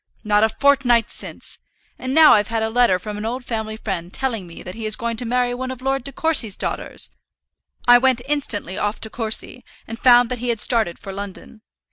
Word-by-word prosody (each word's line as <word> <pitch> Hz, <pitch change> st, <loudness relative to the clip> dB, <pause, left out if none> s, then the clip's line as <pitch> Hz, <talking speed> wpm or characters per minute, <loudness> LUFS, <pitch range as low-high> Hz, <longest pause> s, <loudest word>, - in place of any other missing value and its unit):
Not 210 Hz, -1 st, +2 dB
a 220 Hz, -, +4 dB
fortnight 245 Hz, -3 st, +2 dB
since! -, -, -7 dB, 0.4 s
And 260 Hz, -, -4 dB
now 320 Hz, -1 st, +8 dB
I've 210 Hz, 0 st, +3 dB
had 225 Hz, -1 st, -1 dB
a 220 Hz, -, -2 dB
letter 235 Hz, -5 st, +3 dB
from 210 Hz, +2 st, -7 dB
an -, -, -5 dB
old 250 Hz, +2 st, -5 dB
family 220 Hz, -2 st, -4 dB
friend 185 Hz, -5 st, -5 dB
telling 230 Hz, -8 st, -2 dB
me 170 Hz, -, -11 dB
that 180 Hz, -, -8 dB
he 220 Hz, +1 st, -5 dB
is 215 Hz, -, +3 dB
going 235 Hz, -2 st, -3 dB
to 245 Hz, -, -2 dB
marry 245 Hz, +1 st, 0 dB
one 255 Hz, +1 st, -4 dB
of 260 Hz, -1 st, -6 dB
Lord 270 Hz, 0 st, -1 dB
De 275 Hz, -, -3 dB
Courcy's 270 Hz, -8 st, +2 dB
daughters! -, -, -3 dB, 0.8 s
I 245 Hz, 0 st, +8 dB
went 255 Hz, -2 st, +2 dB
instantly 220 Hz, -, -2 dB
off 205 Hz, +1 st, -2 dB
to 220 Hz, -, -2 dB
Courcy, 225 Hz, +2 st, -2 dB, 0.2 s
and 225 Hz, +1 st, -7 dB
found 245 Hz, -2 st, +5 dB
that 250 Hz, -, -4 dB
he 245 Hz, +1 st, -3 dB
had 230 Hz, -2 st, 0 dB
started 220 Hz, -7 st, +1 dB
for 195 Hz, -, -9 dB
London. 200 Hz, +2 st, -9 dB
230 Hz, 215 wpm, -21 LUFS, 210-250 Hz, 0.8 s, now